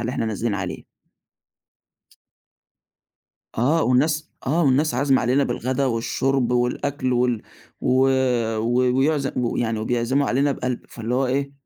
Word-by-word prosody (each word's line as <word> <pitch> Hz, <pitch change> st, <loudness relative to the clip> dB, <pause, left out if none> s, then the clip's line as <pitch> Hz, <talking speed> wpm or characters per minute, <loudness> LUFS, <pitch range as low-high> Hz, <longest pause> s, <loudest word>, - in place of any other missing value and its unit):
اللي 120 Hz, +1 st, -2 dB
إحنا 115 Hz, -, -2 dB
نازلين 110 Hz, 0 st, -2 dB
عليه. 95 Hz, -3 st, -5 dB, 2.7 s
آه، 150 Hz, +8 st, +2 dB
والناس 150 Hz, +5 st, +1 dB, 0.2 s
آه، 160 Hz, +5 st, +2 dB
والناس 145 Hz, +2 st, +2 dB
عازمة 135 Hz, +1 st, +2 dB
علينا 130 Hz, +4 st, +2 dB
بالغدا 130 Hz, +1 st, -1 dB
والشُرْب 125 Hz, +1 st, 0 dB
والأكل 125 Hz, +2 st, 0 dB
وال 120 Hz, -2 st, +1 dB, 0.4 s
و 130 Hz, +1 st, +2 dB, 0.6 s
و 125 Hz, +3 st, +1 dB
ويعز 140 Hz, 0 st, +1 dB
و 120 Hz, -2 st, -1 dB
يعني 115 Hz, -2 st, -1 dB
وبيعزموا 120 Hz, +5 st, 0 dB
علينا 140 Hz, +3 st, +2 dB
بقَلْب، 125 Hz, -2 st, -3 dB
فاللي 115 Hz, +1 st, -4 dB
هو 135 Hz, -, +1 dB
إيه 140 Hz, +2 st, -1 dB
125 Hz, 130 wpm, -22 LUFS, 120-140 Hz, 2.7 s, آه